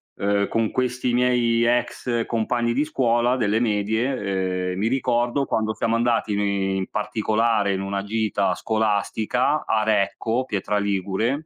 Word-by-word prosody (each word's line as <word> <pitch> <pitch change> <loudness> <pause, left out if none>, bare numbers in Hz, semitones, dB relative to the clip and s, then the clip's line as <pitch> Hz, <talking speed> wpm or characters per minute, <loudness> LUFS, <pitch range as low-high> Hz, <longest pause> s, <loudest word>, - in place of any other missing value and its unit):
uhm, 100 0 0
con 115 -1 0
questi 125 -1 -1
miei 120 -2 +2
ex 120 0 0
compagni 120 +1 0
di 140 +5 +1
scuola 120 -4 +1
delle 110 -2 +1
medie, 100 -4 -1
ehm, 90 - -5
mi 110 - +1
ricordo 120 +1 0
quando 110 0 -1
siamo 115 0 0
andati 115 -3 +1
ni 100 -1 0
in 95 - -2
particolare 105 0 0
in 95 - -2
una 100 0 -2
gita 105 -1 0
scolastica 110 +5 0
a 110 -1 +2
Recco, 110 +4 0
Pietra 105 -3 -1
Ligure. 100 - -1
110 Hz, 140 wpm, -23 LUFS, 100-120 Hz, -, miei